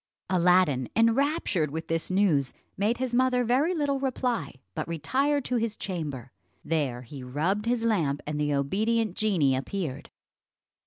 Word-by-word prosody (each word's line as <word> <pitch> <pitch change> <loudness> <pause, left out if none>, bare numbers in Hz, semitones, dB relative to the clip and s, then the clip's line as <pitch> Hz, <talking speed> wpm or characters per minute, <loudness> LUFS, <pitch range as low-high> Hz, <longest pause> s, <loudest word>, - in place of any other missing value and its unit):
Aladdin, 180 -8 +3
enraptured 230 - +2
with 160 +2 -5
this 165 -1 -1
news, 185 -8 +2 0.2
made 210 +4 +1
his 255 -1 -3
mother 250 0 +3
very 270 +10 +2
little 285 -3 0
reply, 255 - -2 0.2
but - - -4
retired 270 - 0
to 250 - 0
his 225 -2 -1
chamber. 145 - -5 0.3
There 140 -6 -1
he 135 +3 -9
rubbed 170 - -1
his 240 -1 +1
lamp, 165 -11 +1
and 150 0 -3
the 150 0 +1
obedient 210 +8 0
genie 170 -11 +2
appeared. 145 +1 -4
190 Hz, 145 wpm, -27 LUFS, 150-240 Hz, 0.3 s, Aladdin